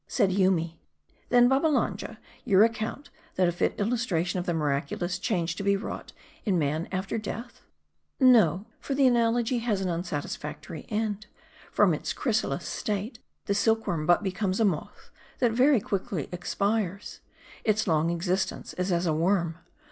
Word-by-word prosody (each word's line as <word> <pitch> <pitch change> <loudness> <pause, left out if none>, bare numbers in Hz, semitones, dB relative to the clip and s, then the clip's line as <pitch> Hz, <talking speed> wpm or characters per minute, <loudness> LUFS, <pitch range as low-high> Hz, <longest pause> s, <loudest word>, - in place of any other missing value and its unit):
Said 190 - +2
Yoomy, 180 -4 +1 0.2
" - - -37
'Then, 245 0 +6
Babbalanja, 275 +3 +1 0.3
you 195 +1 +5
account 230 +5 -2 0.2
that 185 -1 +3
a - - +2
fit 175 - 0
illustration 200 -6 0
of 175 - -5
the 175 - +1
miraculous 150 +4 -1
change 170 -2 -1
to - - -4
be 200 0 +3
wrought 200 - -6 0.3
in 195 -5 +1
man 155 +1 -1
after 190 +4 -2
death 230 +3 -7 0.2
?" - - -51
" - - -50
No; 220 - +5
for 275 - -3
the 275 0 +4
analogy 240 0 +2
has 225 -4 0
an 190 -1 -1
unsatisfactory 150 -2 -5
end. 210 -1 -2 0.4
From 200 -5 +4
its 150 - -3
chrysalis 215 - -1
state, 215 +3 -3 0.3
the 200 - 0
silkworm 200 -7 +1
but 175 +3 +4
becomes 190 0 -1
a 225 - +4
moth, 175 -7 -3 0.3
that 240 -3 +2
very 255 +3 +4
quickly 190 -6 -3
expires. 200 +2 -2 0.4
Its 215 -1 +2
longest 165 0 +1
existence 185 +2 -2
is 180 +1 0
as 175 0 +1
a 160 - +2
worm. 170 0 +1
195 Hz, 160 wpm, -27 LUFS, 170-225 Hz, 0.4 s, Then